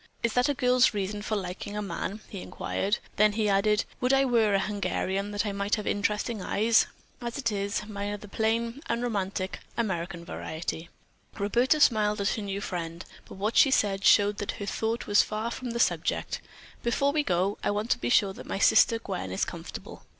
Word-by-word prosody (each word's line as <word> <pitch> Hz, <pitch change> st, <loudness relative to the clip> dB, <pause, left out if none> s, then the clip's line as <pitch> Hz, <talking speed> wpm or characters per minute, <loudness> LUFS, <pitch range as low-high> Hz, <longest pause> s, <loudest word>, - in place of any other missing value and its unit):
"Is 235 Hz, -1 st, +1 dB
that 250 Hz, +3 st, +3 dB
a 285 Hz, -, +1 dB
girl's 250 Hz, -2 st, +4 dB
reason 205 Hz, +1 st, -2 dB
for 215 Hz, +1 st, -2 dB
liking 195 Hz, +1 st, -4 dB
a -, -, -1 dB
man?" 205 Hz, +1 st, -4 dB
he 195 Hz, -, -7 dB
inquired. 205 Hz, +3 st, -2 dB, 0.2 s
Then 210 Hz, 0 st, +5 dB
he 215 Hz, 0 st, +1 dB
added, 210 Hz, +2 st, +2 dB
"Would 250 Hz, +1 st, +2 dB
I 270 Hz, 0 st, +4 dB
were 225 Hz, -5 st, +3 dB
a -, -, +3 dB
Hungarian 195 Hz, 0 st, -1 dB
that 205 Hz, 0 st, -1 dB
I 205 Hz, -, -1 dB
might 200 Hz, +1 st, 0 dB
have 210 Hz, -2 st, -5 dB
interesting 210 Hz, +1 st, -1 dB
eyes. 220 Hz, +5 st, +3 dB, 0.3 s
As 240 Hz, +1 st, -4 dB
it 245 Hz, -5 st, 0 dB
is, 200 Hz, 0 st, -2 dB
mine 205 Hz, -1 st, -4 dB
are -, -, -3 dB
the 210 Hz, -, -12 dB
plain, 230 Hz, +5 st, -1 dB
unromantic 200 Hz, -5 st, -2 dB, 0.2 s
American 175 Hz, -5 st, -2 dB
variety." 160 Hz, -1 st, -5 dB, 0.5 s
Roberta 240 Hz, +9 st, +2 dB
smiled 210 Hz, -6 st, +3 dB
at 200 Hz, -, +1 dB
her 220 Hz, -, -2 dB
new 200 Hz, 0 st, -3 dB
friend, 170 Hz, -3 st, -5 dB, 0.2 s
but -, -, -10 dB
what 205 Hz, +4 st, -2 dB
she 275 Hz, -, +7 dB
said 200 Hz, -6 st, +1 dB
showed 205 Hz, 0 st, +5 dB
that 205 Hz, -, -2 dB
her 205 Hz, -, -6 dB
thought 225 Hz, +3 st, -2 dB
was 205 Hz, 0 st, +5 dB
far 220 Hz, +2 st, -3 dB
from 250 Hz, +1 st, -5 dB
the 235 Hz, 0 st, -3 dB
subject: -, -, 0 dB, 0.4 s
"Before 275 Hz, +4 st, +1 dB
we 300 Hz, +1 st, +2 dB
go, 190 Hz, -4 st, 0 dB
I -, -, +1 dB
want 210 Hz, +3 st, -1 dB
to -, -, +2 dB
be 120 Hz, -, -2 dB
sure 195 Hz, +8 st, +4 dB
that -, -, -11 dB
my -, -, -2 dB
sister, 230 Hz, +3 st, +5 dB
Gwen, 95 Hz, -, -5 dB
is 95 Hz, -, 0 dB
comfortable." -, -, -8 dB
205 Hz, 200 wpm, -28 LUFS, 195-230 Hz, 0.5 s, she